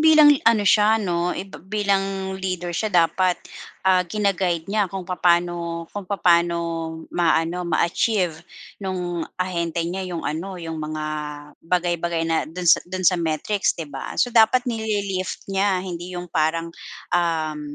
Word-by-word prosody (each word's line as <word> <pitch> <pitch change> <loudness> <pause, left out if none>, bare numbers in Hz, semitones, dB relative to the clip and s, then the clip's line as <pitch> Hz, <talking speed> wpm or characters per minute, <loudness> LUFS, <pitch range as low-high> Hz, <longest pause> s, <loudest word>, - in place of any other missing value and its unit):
bilang 310 -2 +8 0.2
ano 220 -3 +3
siya 210 +2 +5
'no, 175 -4 -1
eh, 190 - -4
bi 195 - -12 0.2
bilang 195 -1 0
leader 180 -2 -3
siya 215 +6 -1
dapat, 180 0 +3 0.5
ah, 185 -1 +5
gina-guide 185 -4 0
niya 210 -3 +2
kung 190 0 -6
papaano 175 -2 0
kung 200 -3 -6
papaano 170 -3 +3 0.6
ma-ano 170 +1 +1
ma-achieve 170 +1 +1 0.4
no'ng 180 -3 -3 0.2
ahente 170 -2 -1
niya 185 +2 -3
'yong 170 -2 -5
ano, 180 +5 -3
'yong 165 -2 -6
mga 155 0 -4 0.6
bagay-bagay 170 -1 0
na 165 0 +1
do'n 180 +2 -6
sa 170 - +6
do'n 185 0 -4
sa 180 -1 +4
metrics 165 +6 0
'di 165 - -4
ba? 145 - -7
So 245 - +1
dapat 235 +2 +5
nili-lift 205 -5 -2
niya 195 -1 +1
hindi 180 0 -6
'yong 175 -1 -7
parang, 165 +1 0 0.4
um, 160 -3 0
180 Hz, 145 wpm, -23 LUFS, 170-195 Hz, 0.6 s, bilang